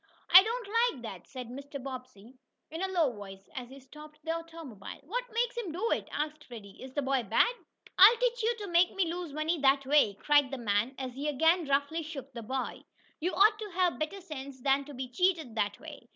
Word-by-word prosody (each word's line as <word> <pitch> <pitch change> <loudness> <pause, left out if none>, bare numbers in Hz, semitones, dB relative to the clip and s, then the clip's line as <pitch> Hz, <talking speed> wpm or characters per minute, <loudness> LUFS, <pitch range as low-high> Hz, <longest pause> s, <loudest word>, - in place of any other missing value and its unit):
"I 370 - +12
don't 460 +2 -3
like 460 - +1
that," 195 -6 -8
said 255 -3 -8
Mr. 280 +3 -7
Bobbsey 255 -4 -9 0.4
in 325 +2 -5
a 385 - 0
low 340 -8 +2
voice, 195 -2 -11
as 245 -2 -6
he 270 +1 -12
stopped 300 +3 -14
the 325 - -1
automobile. 330 -10 -7
"What 480 - -3
makes 475 +2 0
him 460 -8 -4
do 390 +8 -2
it?" - - -1
asked 300 +1 -3
Freddie. 215 -5 -11
"Is 260 0 -10
the 290 - 0
boy 265 -1 +1
bad?" 230 - +2 0.5
"I'll 420 +5 +9
teach - - 0
you 460 +2 +1
to 405 - -5
make 350 +1 +3
me 350 -4 0
lose 350 -3 -5
money 310 +3 -1
that 275 0 +3
way!" 275 -8 +4
cried 290 +4 +3
the 270 - -5
man 225 +2 0
as 260 -2 -5
he 280 +4 -4
again 320 +3 +2
roughly 285 +4 +1
shook 280 -4 -8
the 235 - -6
boy. 260 +3 -4 0.4
"You 355 +4 -2
ought 425 +2 +5
to 425 -1 -6
have 360 -2 +1
better 310 +6 -3
sense 280 -6 -8
than 275 +1 +2
to 290 -1 -10
be 255 0 -4
cheated 320 -1 0
that 205 -2 -1
way! 295 -6 -11
290 Hz, 220 wpm, -30 LUFS, 255-355 Hz, 0.5 s, I